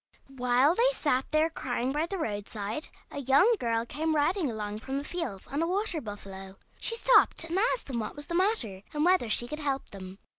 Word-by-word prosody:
While 250 +4 +3
they 475 +6 +4
sat 270 - 0
there 315 +1 +2
crying 255 -3 -2
by 300 +4 0
the 390 - -3
roadside 210 - -4 0.2
a 285 - -5
young 280 - +5
girl 230 -1 0
came 315 +5 -1
riding 310 +2 +1
along 210 -2 -4
from 265 +4 -4
the 280 - -3
fields 290 - -4
on 285 +3 -3
a 330 - +1
water 370 -3 0
buffalo. 195 -3 -9 0.2
She 460 - 0
stopped 485 -6 +4
and 335 +3 -1 0.2
asked - - -6
them 250 -4 -3
what 215 - -4
was 290 0 -6
the 345 - -6
matter, 340 - +1
and 300 +2 +1
whether 360 -10 +3
she 240 +3 +2
could 300 +5 -5
help 275 -3 -2
them. 190 -1 -9
280 Hz, 210 wpm, -29 LUFS, 225-330 Hz, 0.2 s, young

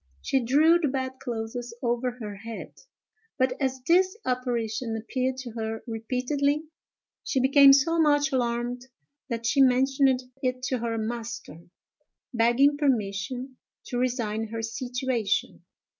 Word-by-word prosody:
She 265 - 0
drew 310 +8 +5
the 315 - +1
bed 260 -1 -3
clothes 235 0 -5
over 240 +1 -1
her 210 -3 -6
head; 225 +2 -8 0.6
but, 260 0 +2
as 265 -1 -1
this 370 +7 +3
apparition 240 -2 -2
appeared 255 +3 -2
to 245 -2 -8
her 225 0 -4
repeatedly, 255 +6 -1 0.6
she 265 - 0
became 275 +2 +7
so 305 +5 +4
much 290 -2 +3
alarmed 245 0 -1 0.4
that 230 -1 -3
she 275 +5 +3
mentioned 265 0 +3 0.2
it 255 -1 -2
to 255 0 -1
her 230 0 -2
master, 225 -7 -5 0.7
begging 240 +5 +4
permission 250 -1 -1 0.3
to 245 - -2
resign 225 -3 -1
her 225 +1 -5
situation. 245 -2 -2
250 Hz, 130 wpm, -26 LUFS, 230-265 Hz, 0.7 s, became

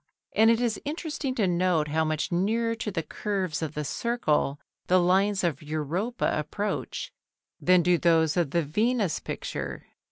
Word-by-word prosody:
And 225 +1 +6
it 230 0 +4
is 235 -3 -1
interesting 295 -3 -3
to 215 - +2
note 175 -4 +1
how 160 +2 +1
much 155 +1 -1
nearer 225 +6 +1
to 225 -1 -4
the 165 -5 -2
curves 190 -7 -3
of 155 -2 -4
the 150 0 -2
circle 150 - 0 0.3
the 185 +1 +5
lines 190 +3 +2
of 170 -2 0
Europa 155 - -2
approach 200 +8 -3 0.5
than 180 -1 +4
do 175 0 +3
those 160 -2 +3
of 170 -5 +1
the 170 +3 +1
Venus 210 - 0
picture. - - -5
180 Hz, 160 wpm, -27 LUFS, 160-220 Hz, 0.5 s, And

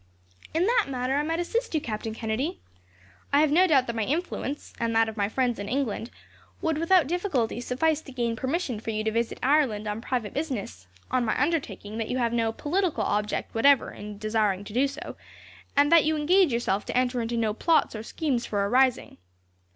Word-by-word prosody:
"In 330 +3 +1
that 465 0 +2
matter, 255 0 -1
I - - +2
might 325 +2 -1
assist 455 +3 -2
you, - - +3
Captain 220 -3 -5
Kennedy. 240 +11 -2 0.7
I 285 - +5
have 305 -2 +3
no 360 +5 +5
doubt 275 -6 +4
that 235 - -4
my 225 - -1
influence, 295 - -3
and 230 -1 -1
that 225 0 +4
of 220 - -5
my 200 -2 0
friends 245 -1 0
in 200 0 -5
England, 245 -4 -2 0.5
would 320 -2 -1
without 335 0 +4
difficulty 290 - -1
suffice 300 +6 0
to 275 - -12
gain 240 -2 -1
permission 260 -1 -2
for 225 - -6
you 215 -1 -1
to 220 - 0
visit 230 +1 -1
Ireland 260 -7 +2
on 210 +2 -3
private 240 -4 -3
business, 220 - -4 0.2
on 255 -1 +2
my 220 - 0
undertaking 275 -8 -2
that 225 - -3
you 255 - -1
have 235 -2 0
no 225 -1 +1
political 345 - -1
object 210 0 -1
whatever 275 +3 +4
in 210 0 -9
desiring 210 -2 0
to 205 - -10
do 260 +4 +3
so, 275 - -8 0.6
and 290 +2 +5
that 335 -2 +7
you 315 0 +1
engage 350 +2 +4
yourself 235 -4 0
to - - -2
enter 250 -1 +1
into 235 +1 -2
no 220 -2 +1
plots 325 +8 +2
or 215 - -4
schemes 250 +1 -2
for 200 -1 -1
a - - -2
rising. 255 - +2
250 Hz, 205 wpm, -26 LUFS, 220-305 Hz, 0.7 s, that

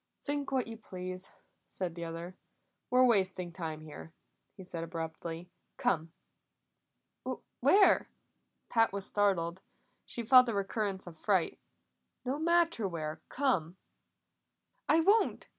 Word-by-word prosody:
"Think 285 -1 -2
what 260 -2 +1
you 225 -1 -8
please," 185 -3 -7 0.4
said 180 -3 -3
the 170 0 -5
other. 165 +2 -6 0.5
"We're 255 0 +5
wasting 190 -6 +2
time 160 -2 -5
here," 145 - -10 0.4
he 190 - -9
said 170 -2 -4
abruptly. 165 +1 -6 0.3
"Come." 165 -2 0 1.5
"Where?" 400 0 +5 0.6
Pat 225 -1 +3
was 200 -1 -3
startled; 190 -3 +1 0.5
she 235 - -4
felt 250 +1 +8
a 225 - -1
recurrence 200 -1 -2
of 175 -2 -10
fright. 190 -5 +1 0.7
"No 265 +4 -1
matter 335 - +2
where. 155 -3 -4
Come." 190 - 0 1.1
"I 325 - +6
won't! 415 +6 +2
190 Hz, 120 wpm, -32 LUFS, 170-245 Hz, 1.5 s, felt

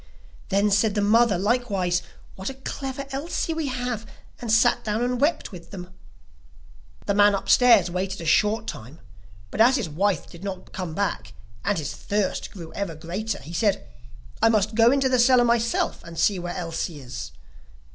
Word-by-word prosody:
Then 200 +1 +2
said 210 +1 +2
the 205 - +1
mother 215 0 +4
likewise: 195 -4 0 0.3
'What 190 +4 -5
a 270 - -7
clever 270 0 -5
Elsie 315 +4 -2
we 320 -2 -2
have!' 245 -4 -3 0.3
and 235 -2 -3
sat 225 +1 +4
down 215 +2 -1
and 250 +1 -1
wept 295 -3 +1
with 175 -3 -11
them. 185 -1 -9 1.1
The 200 - +1
man 205 0 +5
upstairs 215 -3 +4
waited 185 +2 -3
a 165 - -7
short 215 +7 +2
time, 135 - -8 0.5
but - - 0
as 250 +3 +6
his 235 -9 -1
wife 185 +2 0
did 170 +2 -13
not 195 -2 -6
come 180 -4 -5
back - - -2 0.3
and 205 0 0
his 150 -3 -3
thirst 205 -2 -2
grew 165 -4 -10
ever 195 -5 -4
greater, 195 +7 -4
he 160 +5 -9
said: 205 +3 0 0.5
'I - - +5
must 215 -1 +1
go 230 +2 +5
into 275 -1 +2
the 255 -1 +2
cellar 245 0 +5
myself 235 0 0
and 165 0 -10
see 195 +1 +2
where 175 0 -5
Elsie 165 -2 -4
is. 65 - -7
205 Hz, 175 wpm, -24 LUFS, 180-235 Hz, 1.1 s, as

